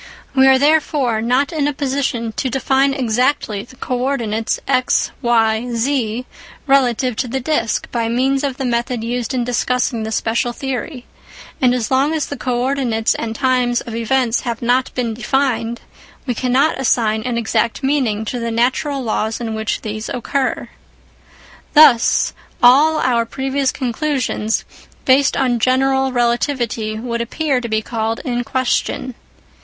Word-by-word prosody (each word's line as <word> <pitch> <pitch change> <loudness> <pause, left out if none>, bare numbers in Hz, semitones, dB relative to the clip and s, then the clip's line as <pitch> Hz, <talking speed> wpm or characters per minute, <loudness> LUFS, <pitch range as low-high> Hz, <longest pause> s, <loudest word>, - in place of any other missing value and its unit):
We 265 -1 +5
are 265 0 +6
therefore 285 -5 +2
not 250 +7 +1
in 295 -3 0
a 295 - -1
position 265 -4 -2
to 260 - -2
define 270 +2 +2
exactly 245 -3 0
the 240 +4 -14
co 250 -1 -3
ordinates 230 -4 -1
x, 255 -2 +1
y, 230 -1 +2
z 240 -1 -1 0.4
relative 255 -3 +2
to 255 - -1
the 265 +3 -2
disc 255 -4 -1
by 230 -2 -1
means 265 +4 +1
of 270 -2 -2
the 265 - -3
method 240 -1 -1
used 240 +1 -2
in 255 -2 0
discussing 245 -1 0
the 220 0 -4
special 235 +2 0
theory, 260 0 -5 0.6
and 250 -2 +4
as 240 -2 -2
long 275 +4 +2
as 305 - -1
the 285 - -6
co 245 -3 -2
ordinates 250 -5 0
and 225 -1 -4
times 250 -2 +1
of 235 - -8
events 235 +1 +1
have 235 -2 -4
not 250 +2 +1
been 240 -3 -1
defined, 235 -1 -1 0.4
we 250 - -1
cannot 260 +5 +1
assign 220 -4 +1
an 245 0 -2
exact 230 +2 -1
meaning 255 -6 0
to 245 +3 -3
the 230 0 -2
natural 255 +4 0
laws 220 -1 -1
in 230 -2 -4
which 220 -1 -2
these 215 0 -5
occur. 260 +2 -2 1.1
Thus 290 -6 +5 0.3
all 290 +6 +6
our 245 -4 +2
previous 265 +3 -1
conclusions 255 -4 -1 0.4
based 265 +1 +4
on 250 -3 +1
general 265 +2 +2
relativity 240 -3 -1
would 235 +1 -3
appear 270 +2 -1
to 235 - -5
be 220 0 0
called 225 0 -2
in 245 -2 -1
question. 255 +1 -1
250 Hz, 155 wpm, -18 LUFS, 230-270 Hz, 1.1 s, are